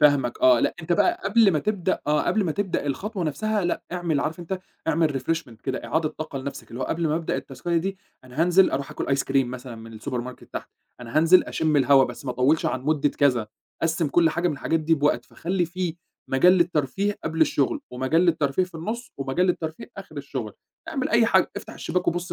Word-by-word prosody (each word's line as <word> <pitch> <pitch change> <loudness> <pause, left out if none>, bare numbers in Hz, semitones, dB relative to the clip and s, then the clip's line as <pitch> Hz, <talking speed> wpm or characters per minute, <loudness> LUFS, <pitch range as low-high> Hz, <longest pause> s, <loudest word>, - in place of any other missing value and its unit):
فاهمك 145 -5 +3
آه، 125 -2 +6
لأ - - +1
أنت 165 +2 -1
بقى 350 - +2
قبل 210 +1 +5
ما 155 - +2
تبدأ 190 0 -1
آه، 150 0 +2
قبل 210 -3 +1
ما 160 - 0
تبدأ 190 -5 -2
الخطوة 190 +6 -3
نَفْسها 210 +6 -1
لأ، 175 - -1
اعمل 170 -5 0
عارف 160 +2 -2
أنت؟ 185 +2 -4 0.3
اعمل 155 -4 +2
refreshment 130 -6 -3
كده، 130 -2 -3
إعادة 160 0 0
طاقة 155 -3 -6
لنَفْسك 140 +1 -7
اللي 120 +3 -7
هو - - 0
قبل 165 -1 -1
ما 150 - +1
أبدأ 165 - -2
التاسكاية 160 +6 -3
دي، 190 +3 -1 0.3
أنا 130 +6 -2
هانزِل 180 +2 +5
أرُوح 140 0 -3
أكُل - - -4
أيس 135 0 +1
كِريم 135 -2 +1
مثلًا 125 -1 -7
من 115 -1 -11
الsupermarket 125 -1 -5
تحت، - - -6 0.3
أنا 120 +3 -6
هانزِل 165 +3 +6
أشم 155 -2 0
الهوا، 135 -1 +6
بس - - -8
ما 125 - -2
أطوّلش 130 +6 +2
عن 130 - -1
مدة 145 0 +2
كذا. 125 -8 +2 0.4
قسّم 160 -2 +1
كُلّ 165 +2 +4
حاجة 175 +2 0
من 150 - -1
الحاجات 160 +3 0
دي 165 +1 +3
بوقت، 145 -5 +1
فخلّي 180 +6 -2
فيه 175 -1 -3 0.4
مجال 135 +7 +6
للترفيه 175 +3 +1
قبل 160 +1 -3
الشغل، 145 -3 +2
ومجال 130 +6 +1
للترفيه 160 -2 +2
في 180 -2 -17
النص، 220 +9 -5
ومجال 135 +7 0
للترفيه 170 +5 -3
آخر 180 -6 -10
الشغل، 130 -6 -5 0.4
اعمل - - -1
أي - - +4
حاجة - - +3
افتح - - -7
الشباك 180 0 -1
وبُص 175 +1 -2
155 Hz, 210 wpm, -25 LUFS, 135-175 Hz, 0.4 s, آه